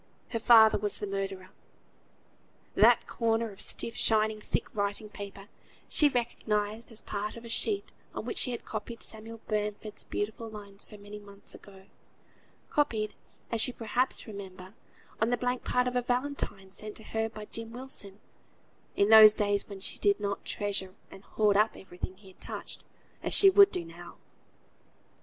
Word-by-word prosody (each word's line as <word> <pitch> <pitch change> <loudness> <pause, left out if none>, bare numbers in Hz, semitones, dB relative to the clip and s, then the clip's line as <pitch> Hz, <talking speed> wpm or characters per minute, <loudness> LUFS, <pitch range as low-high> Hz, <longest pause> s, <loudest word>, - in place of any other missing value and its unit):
Her 230 - -2
father 220 -2 +7
was 205 0 -1
the - - -4
murderer! 195 -1 -4 1.2
That - - +5
corner 230 -1 0
of 195 - -11
stiff, 230 - +1
shining, 215 -1 +2
thick - - -2
writing 205 +1 -2
paper, 200 -1 -9 0.4
she 295 - +4
recognised 225 -3 -2
as 225 - -5
part 210 +1 -4
of 230 - -10
the 235 - -9
sheet 400 - -1 0.2
on - - -4
which - - -1
she - - +3
had 240 - -5
copied 230 +2 -6
Samuel 225 +1 -3
Bamford's 210 0 -3
beautiful 220 +2 -4
lines 205 -2 -7
so 210 - -6
many 205 +1 -10
months 200 -1 -13
ago 195 -1 -14 0.9
copied 220 -8 +1 0.4
(as 230 +1 +3
you 255 - -6
perhaps 240 +3 -1
remember) 190 -3 -9 0.5
on 220 - +3
the 245 - +1
blank 250 0 -1
part 250 0 +1
of 250 - -2
a 250 - +3
valentine 245 -6 -2
sent 215 +2 -7
to 220 - -12
her 225 +1 -2
by 215 -1 -9
Jem 225 +1 -7
Wilson, 230 -5 -5 0.8
in 200 - +3
those 215 -1 +10
days 205 -1 +1
when 195 -1 -8
she - - -1
did 205 0 +3
not 200 -1 -3
treasure 195 -2 -3 0.2
and 190 - -12
hoard 210 -1 +2
up 215 +2 +3
every 180 -1 -14
thing 185 - -5
he 195 -1 -16
had 185 - -21
touched, - - -8 0.4
as - - +1
she 390 -1 +8
would 400 +1 +8
do 170 - -3
now. 170 +1 -11
215 Hz, 170 wpm, -30 LUFS, 200-230 Hz, 1.2 s, those